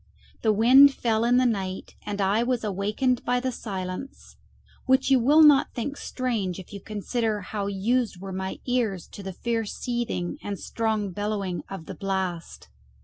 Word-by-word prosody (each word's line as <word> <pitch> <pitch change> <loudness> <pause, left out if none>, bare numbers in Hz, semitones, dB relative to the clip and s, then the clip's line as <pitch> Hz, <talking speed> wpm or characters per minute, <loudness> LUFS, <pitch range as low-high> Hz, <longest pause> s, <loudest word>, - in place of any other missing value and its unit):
The 220 - +3
wind 260 +6 +7
fell 225 -2 +1
in 245 +1 +4
the 255 - +4
night, 190 -5 -2
and 205 0 -3
I 200 +3 +2
was 245 -1 0
awakened 210 +5 0
by 245 0 +1
the 260 +1 -2
silence, 195 +2 -6 0.5
which 265 +1 +3
you 265 - +6
will 295 +7 +6
not 290 -3 +5
think 275 +4 -3
strange 230 -11 -2
if 190 +1 -11
you 200 - -7
consider 215 +1 -2
how 200 +1 -4
used 210 +1 0
were 195 0 -7
my 190 0 -4
ears 230 -8 -1
to - - -10
the 190 -1 -5
fierce 225 +2 -2
seething 240 -8 -3
and 200 -1 -5
strong 220 -3 -1
bellowing 200 -2 -2
of 190 -5 -7
the - - -7
blast. 190 -3 -4
215 Hz, 170 wpm, -26 LUFS, 195-245 Hz, 0.5 s, wind